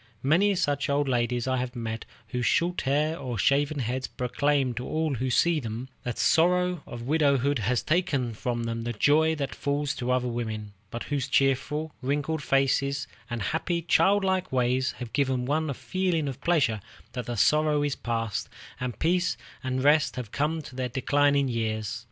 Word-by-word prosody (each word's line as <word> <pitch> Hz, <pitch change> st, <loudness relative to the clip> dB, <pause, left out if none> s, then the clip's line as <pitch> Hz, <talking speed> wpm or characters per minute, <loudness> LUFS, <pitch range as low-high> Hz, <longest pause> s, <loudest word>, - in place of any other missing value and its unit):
Many 185 Hz, +9 st, +3 dB
such 145 Hz, -6 st, 0 dB
old 140 Hz, 0 st, +1 dB
ladies 120 Hz, -1 st, 0 dB
I 130 Hz, 0 st, +1 dB
have 125 Hz, 0 st, -3 dB
met, 115 Hz, -1 st, -4 dB, 0.2 s
whose 125 Hz, -2 st, -1 dB
short 175 Hz, +7 st, +1 dB
hair 155 Hz, +4 st, +1 dB
or 125 Hz, -3 st, -4 dB
shaven 145 Hz, +5 st, +2 dB
heads 130 Hz, +1 st, -2 dB
proclaim 135 Hz, +1 st, 0 dB
to 120 Hz, +2 st, -4 dB
all 155 Hz, -1 st, 0 dB
who 130 Hz, +1 st, -1 dB
see 170 Hz, +5 st, +3 dB
them 120 Hz, 0 st, -5 dB
that 120 Hz, -2 st, -4 dB
the -, -, -2 dB
sorrow 180 Hz, 0 st, +3 dB
of 120 Hz, -1 st, -7 dB
widowhood 140 Hz, -1 st, +2 dB
has 115 Hz, +3 st, 0 dB
taken 155 Hz, -8 st, 0 dB
from 120 Hz, +2 st, -2 dB
them 115 Hz, 0 st, -3 dB
the 120 Hz, +1 st, -3 dB
joy 155 Hz, +7 st, +3 dB
that 140 Hz, -3 st, -3 dB
falls 145 Hz, 0 st, -1 dB
to 125 Hz, 0 st, -3 dB
other 125 Hz, 0 st, +1 dB
women, 110 Hz, -3 st, -4 dB, 0.2 s
but 120 Hz, +2 st, -5 dB
whose 140 Hz, -2 st, -2 dB
cheerful, 140 Hz, +3 st, +1 dB
wrinkled 145 Hz, +4 st, -1 dB
faces 140 Hz, 0 st, +1 dB, 0.2 s
and 120 Hz, -3 st, -3 dB
happy, 170 Hz, -, -1 dB
childlike 190 Hz, +1 st, +2 dB
ways 130 Hz, +1 st, +1 dB
have 120 Hz, -3 st, -8 dB
given 130 Hz, 0 st, +1 dB
one 155 Hz, +3 st, 0 dB
a 140 Hz, -, -2 dB
feeling 180 Hz, -3 st, -1 dB
of 135 Hz, 0 st, -5 dB
pleasure 140 Hz, -11 st, +2 dB, 0.3 s
that 125 Hz, -2 st, -5 dB
the 120 Hz, -1 st, -3 dB
sorrow 150 Hz, -1 st, +3 dB
is 145 Hz, -1 st, 0 dB
past, 115 Hz, -3 st, -2 dB, 0.3 s
and 125 Hz, -2 st, -4 dB
peace 175 Hz, +2 st, +1 dB, 0.3 s
and 130 Hz, 0 st, -1 dB
rest 150 Hz, +1 st, +4 dB
have 120 Hz, -5 st, -6 dB
come 155 Hz, +2 st, -1 dB
to 130 Hz, -, -11 dB
their 130 Hz, -1 st, -2 dB
declining 140 Hz, +2 st, +2 dB
years. 110 Hz, -3 st, -2 dB
135 Hz, 180 wpm, -27 LUFS, 120-155 Hz, 0.3 s, rest